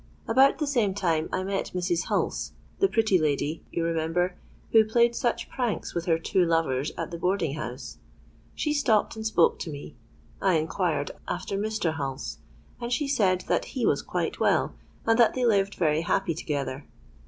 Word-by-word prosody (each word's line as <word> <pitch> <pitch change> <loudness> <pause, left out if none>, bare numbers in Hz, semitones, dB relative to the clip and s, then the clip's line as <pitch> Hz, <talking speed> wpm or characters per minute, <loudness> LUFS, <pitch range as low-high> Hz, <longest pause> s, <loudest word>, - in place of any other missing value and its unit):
About 265 +4 +5
the 305 - -1
same 235 -9 +1
time 165 -5 0
I 185 - -1
met 195 0 -3
Mrs. 175 -1 0
Hulse—the 390 - -1
pretty 220 - +2
lady, 150 +1 -1
you 170 - -1
remember, 165 +2 0 0.4
who 220 -1 +7
played 235 +2 +3
such 240 - -1
pranks 245 -4 -2
with 170 -1 -2
her 165 -2 +3
two 180 +3 +1
lovers 160 -5 +1
at - - -4
the 170 - -5
boarding 180 -5 0
house. 130 -4 -6 0.6
She 300 - 0
stopped 235 -9 +2
and 220 0 -3
spoke 175 -6 +3
to - - -5
me. 145 -4 -8 0.5
I 190 -3 +3
inquired 160 -2 0 0.2
after 185 +2 -3
Mr. 210 -5 -1
Hulse; 135 - -4 0.4
and 235 0 -4
she 280 +4 0
said 195 -10 +2
that - - 0
he - - +1
was - - +2
quite - - -3
well, - - +2 0.3
and 225 +1 +3
that 235 - +5
they 255 -1 +1
lived 200 -3 +2
very 155 -2 +2
happy 170 +1 0
together. 140 -3 -4
180 Hz, 175 wpm, -27 LUFS, 160-220 Hz, 0.6 s, who